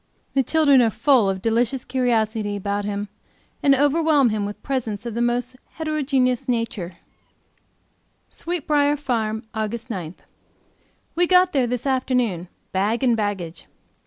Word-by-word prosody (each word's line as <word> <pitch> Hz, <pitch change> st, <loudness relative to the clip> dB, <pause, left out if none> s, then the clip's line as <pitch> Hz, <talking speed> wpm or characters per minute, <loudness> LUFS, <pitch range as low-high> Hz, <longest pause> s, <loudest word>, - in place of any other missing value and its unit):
The 275 Hz, -, +3 dB
children 285 Hz, -1 st, +4 dB
are 230 Hz, -, +4 dB
full 250 Hz, -2 st, +3 dB
of 190 Hz, -1 st, -3 dB
delicious 235 Hz, +3 st, 0 dB
curiosity 220 Hz, -4 st, 0 dB
about 200 Hz, +1 st, -2 dB
him, 205 Hz, 0 st, -3 dB, 0.5 s
and 275 Hz, -1 st, +5 dB
overwhelm 290 Hz, -1 st, +3 dB
him 210 Hz, -2 st, -1 dB
with 205 Hz, -, -9 dB
presents 235 Hz, -5 st, -3 dB
of 235 Hz, -, -4 dB
the 235 Hz, -, -2 dB
most 245 Hz, +1 st, -1 dB, 0.2 s
heterogeneous 275 Hz, -5 st, 0 dB
character. 230 Hz, -8 st, -3 dB, 1.3 s
Sweet 345 Hz, -3 st, -5 dB
Briar 290 Hz, -1 st, +3 dB
Farm, 225 Hz, -5 st, -2 dB
AUG. 220 Hz, +1 st, -2 dB
9. 180 Hz, -4 st, -5 dB, 1.0 s
We 350 Hz, +1 st, +2 dB
got 365 Hz, 0 st, +4 dB
there 260 Hz, -4 st, +2 dB
this 245 Hz, +1 st, -3 dB
afternoon, 250 Hz, -9 st, 0 dB, 0.2 s
bag 210 Hz, +7 st, 0 dB
and 245 Hz, -3 st, +4 dB
baggage. 200 Hz, -6 st, -4 dB
240 Hz, 135 wpm, -22 LUFS, 210-275 Hz, 1.3 s, and